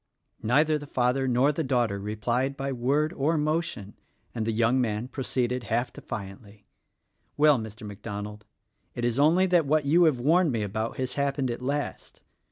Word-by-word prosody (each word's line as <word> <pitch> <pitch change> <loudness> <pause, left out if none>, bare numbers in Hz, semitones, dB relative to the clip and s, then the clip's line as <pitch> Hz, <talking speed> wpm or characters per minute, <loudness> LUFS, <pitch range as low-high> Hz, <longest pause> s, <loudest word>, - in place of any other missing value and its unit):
Neither 150 +7 +2
the 145 - -10
father 130 +1 +1
nor 130 +3 +3
the 160 +2 -2
daughter 120 -7 0
replied 120 +6 -1
by 135 0 -3
word 140 +6 0
or 155 +3 +1
motion, 155 - -2 0.4
and 110 -1 -3
the - - +1
young 115 +3 +2
man 110 0 -2
proceeded 125 -2 -2
half 120 +3 -1
defiantly, 100 +1 -9 0.7
"Well, 150 -3 +5
Mr. 110 0 -8
MacDonald, 105 0 -7 0.5
it 120 - -2
is 120 +2 0
only 165 +6 +5
that 175 -5 +2
what 155 0 +2
you 170 +5 +5
have 150 -6 +2
warned 165 +5 +3
me 115 -3 -1
about 110 +3 -3
has 130 -1 -2
happened, 140 -2 -1
at 120 - -5
last. 145 +3 -4
125 Hz, 170 wpm, -27 LUFS, 110-145 Hz, 0.7 s, Well